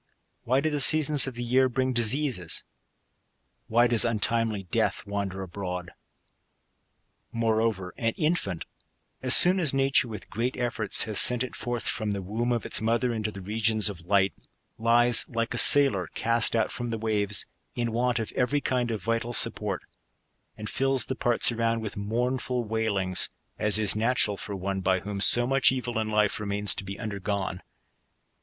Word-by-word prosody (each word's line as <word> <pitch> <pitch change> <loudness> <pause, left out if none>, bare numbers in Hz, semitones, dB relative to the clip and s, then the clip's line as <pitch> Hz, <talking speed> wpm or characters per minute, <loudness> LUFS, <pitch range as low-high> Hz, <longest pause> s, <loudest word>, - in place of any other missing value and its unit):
Why 130 +3 +1
do 155 +1 -1
the 145 - -2
seasons 150 0 +8
of 130 - -6
the 120 - -5
year 130 +2 +2
bring 130 +1 -1
dis 120 0 +3
eases? 130 - -2 1.0
Why 120 +2 +3
does 120 -2 +3
untimely 115 -2 -1
death 90 - -2
wander 100 -1 -4
abroad? 90 -2 -6 1.4
Moreover, 110 -5 -1
an 115 -1 -1
infant, 150 - -2 0.6
as 130 -1 +5
soon 185 +2 +5
as 155 -6 +2
nature, 135 -2 +2
with 105 -4 -10
great 120 +4 -3
efforts, 120 -4 -1
has 110 -2 0
sent 125 0 +4
it 130 - -7
forth 120 -3 -4
from 110 -2 -2
the 100 -1 -5
womb 115 +6 -3
of 120 -2 -2
its - - -1
mother 115 +2 0
into 110 -1 -3
the 100 -2 -10
regions 110 +1 +1
of 85 -3 -14
light, 100 0 +2 0.5
lies, 120 +1 +3
like 115 0 -3
a 120 - +1
sailor 125 - +4
cast 115 0 +2
out 115 - 0
from 120 -1 -5
the 115 - -3
waves, 105 -2 +2 0.3
in 120 -1 -2
want 120 +1 -1
of 115 -2 -4
every 135 +3 -1
kind 125 -3 -2
of 110 -2 -5
vital 115 +1 -2
support; 105 -5 +1 0.7
and 105 - -7
fills 135 +1 0
the 130 - -4
parts 120 0 +1
arouud 115 0 -1
with 110 -3 -7
mournful 125 +4 -2
wailings, 105 -4 0 0.3
as 105 0 +4
is 105 -2 +1
natural 110 -2 +1
for 100 +1 -7
one 95 +1 -4
by 95 -1 0
whom 100 0 -6
so 120 +4 +5
mu(:h 135 +1 +3
evil 120 -3 -3
in 110 -1 -3
life 105 -1 0
remains 105 -1 -2
to - - -7
be 100 +1 -8
undergone. 100 -3 -4
115 Hz, 175 wpm, -26 LUFS, 100-120 Hz, 1.4 s, seasons